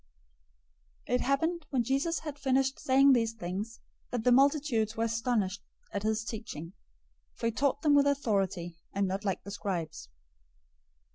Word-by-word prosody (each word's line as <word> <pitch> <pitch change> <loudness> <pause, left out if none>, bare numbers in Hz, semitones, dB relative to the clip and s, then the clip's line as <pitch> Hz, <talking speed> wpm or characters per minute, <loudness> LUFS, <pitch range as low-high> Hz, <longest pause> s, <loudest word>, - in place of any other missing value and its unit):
007:028 - - -2
It 250 - +1
happened, 320 +4 0
when 255 -4 +1
Jesus 275 +7 0
had 300 -2 -7
finished 270 0 +1
saying 270 +1 +5
these 230 -2 +2
things, 210 +3 -5 0.3
that 245 -3 -2
the 250 - +4
multitudes 265 -5 +3
were 225 - +1
astonished 225 -4 0 0.3
at 200 - -1
his 220 +1 0
teaching, 205 -7 -6 0.6
007:029 - - -35
for - - -4
he 230 - +2
taught 280 +4 0
them 300 -2 +4
with 285 0 +5
authority, 195 -10 0 0.2
and 200 -1 +1
not 190 +2 -3
like 195 -3 -2
the 200 - -8
scribes. 170 - -4
230 Hz, 160 wpm, -30 LUFS, 200-275 Hz, 0.6 s, saying